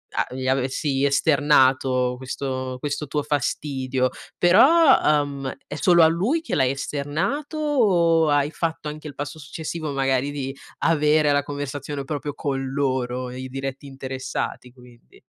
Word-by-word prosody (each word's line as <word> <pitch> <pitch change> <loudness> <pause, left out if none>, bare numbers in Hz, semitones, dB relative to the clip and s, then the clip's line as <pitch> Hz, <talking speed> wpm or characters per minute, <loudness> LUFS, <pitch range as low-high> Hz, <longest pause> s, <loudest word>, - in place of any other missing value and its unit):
a - - +2
gli 130 0 -4
avessi 135 +1 0
esternato 135 -3 +3
questo 130 0 -4
questo 145 +1 -3
tuo 150 +1 -2
fastidio, 130 -2 -1 0.3
però, 265 - +6
ehm, 145 -3 +1
è - - -8
solo 175 -4 +5
a - - +8
lui 205 - 0
che - - -6
l'hai 130 -2 +3
esternato 150 - -3
o 180 - +3
hai 145 +1 +2
fatto 160 -2 -3
anche 155 +1 -8
il 145 - -9
passo 145 +2 -6
successivo, 155 +2 -5
magari 135 0 0
di 135 -1 -4 0.3
avere 150 -2 +3
la 145 0 +3
conversazione 145 0 -5
proprio 145 +1 -4
con 135 -2 -2
loro, 130 -2 -1
i 130 +1 -6
diretti 135 +1 -5
interessati 130 -1 -5
quindi? 125 - -19
145 Hz, 140 wpm, -23 LUFS, 130-155 Hz, 0.3 s, a